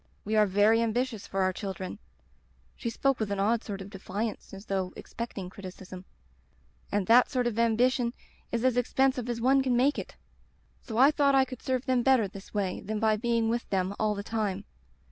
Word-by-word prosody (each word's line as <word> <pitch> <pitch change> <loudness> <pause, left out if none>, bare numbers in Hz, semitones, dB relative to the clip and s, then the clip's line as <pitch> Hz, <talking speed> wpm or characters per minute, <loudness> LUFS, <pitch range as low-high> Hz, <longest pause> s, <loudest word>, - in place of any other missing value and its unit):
We 215 +2 -1
are 210 -1 +5
very 205 +4 +4
ambitious 230 -1 -1
for 195 0 0
our 185 0 +1
children' 190 0 -5 0.4
— - - -36
^she 235 - -2
spoke 275 +3 +1
with 215 -2 -2
an 200 - -1
odd 220 +3 +1
sort 200 -2 -6
of 195 +1 -9
defiance 200 +3 -5
as 195 +1 -10
though 190 -2 -2
ex - - -12
pecting 200 -6 -5
criticism 185 -1 -10 0.4
— 65 -1 -37 0.3
*and 205 -1 0
that 240 +4 +6
sort 250 -3 0
of 230 -2 -1
ambition 235 +1 +2 0.4
is 235 +1 -1
as 255 -1 +3
expensive 255 0 +1
as 235 -1 -2
one 265 +3 +4
can 255 -2 +1
make 275 +4 +3
it. - - -8 0.7
So 225 -3 -6
I 270 +4 +7
thought 285 -2 +3
I 265 -1 +5
could 255 0 -9
serve 255 -1 -1
them 255 -2 +2
better 255 -4 +4
this 195 +1 -12
way 195 -3 -2
than 215 +1 -3
by 220 0 +3
being 230 0 0
with 235 +1 -2
them 190 0 0
all 215 -1 +1
the 200 - -5
time. 205 -3 -2
225 Hz, 210 wpm, -28 LUFS, 195-245 Hz, 0.7 s, I